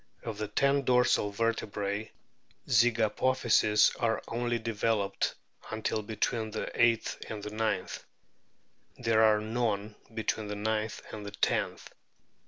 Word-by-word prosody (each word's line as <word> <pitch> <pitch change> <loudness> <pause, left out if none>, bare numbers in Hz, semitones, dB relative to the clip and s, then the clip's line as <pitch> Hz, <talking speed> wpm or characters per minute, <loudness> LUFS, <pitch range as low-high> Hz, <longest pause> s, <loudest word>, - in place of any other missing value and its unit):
Of 110 -3 -5
the 105 - -2
ten 140 +6 +2
dorsal 125 -4 +3
vertebrae 105 -1 -2 0.6
zygapophyses 115 -2 +3
are 115 -2 +2
only 120 0 -1
developed 110 -3 -1 0.3
until 110 0 -1
between 110 +1 -2
the 110 - -4
eighth 115 -2 +2
and 105 -2 -6
ninth; 105 -4 -2 0.9
there 115 -2 +2
are 110 -1 +5
none 110 -2 -1 0.2
between 110 -1 -2
the 105 - -4
ninth 110 +1 -2
and 105 -1 -7
tenth. - - 0
110 Hz, 110 wpm, -30 LUFS, 105-115 Hz, 0.9 s, are